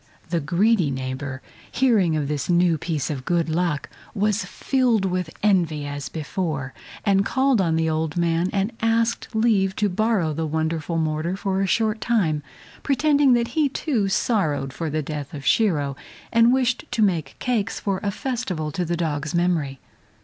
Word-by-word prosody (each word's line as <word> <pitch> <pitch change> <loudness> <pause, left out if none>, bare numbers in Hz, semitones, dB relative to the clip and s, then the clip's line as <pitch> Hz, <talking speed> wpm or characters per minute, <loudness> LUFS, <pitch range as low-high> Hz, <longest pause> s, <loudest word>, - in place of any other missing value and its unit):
The 170 - +2
greedy 180 +3 +2
neighbor, 130 0 -4 0.3
hearing 215 -11 +3
of 150 -2 -1
this 145 +1 -3
new 175 -2 +3
piece 155 -3 -2
of 135 -3 -4
good 170 +2 0
luck, 165 -3 0 0.3
was 210 +1 +1
filled 245 -7 +1
with 180 -2 -1
envy 170 -8 +2
as 145 0 -5
before, 155 -4 -3 0.3
and 195 -1 +4
called 260 -1 +2
on 165 -3 +1
the 160 0 +1
old 160 0 -1
man 170 +1 +1
and 200 +2 0
asked 225 +1 +1
leave 210 -4 +2
to 210 -1 +1
borrow 200 -4 +1
the 160 +1 -2
wonderful 160 +1 -1
mortar 160 +3 -1
for 195 -1 -1
a 195 - +1
short 220 +2 +1
time, 180 -11 +1 0.4
pretending 285 -1 +3
that 235 -1 +1
he, 310 -3 +1
too, 255 -7 -1
sorrowed 160 - 0
for 165 0 -3
the 155 +1 -1
death 145 -1 -5
of 140 - -8
Shiro, 150 -11 +2 0.4
and 230 +1 +6
wished 255 -2 +1
to 220 - +1
make 165 -9 0
cakes 225 -3 -1
for 195 -2 -1
a 205 - -1
festival 200 - -3
to 180 - -2
the 170 0 -2
dog's 155 -1 -2
memory. 165 -6 0
175 Hz, 170 wpm, -23 LUFS, 155-220 Hz, 0.4 s, and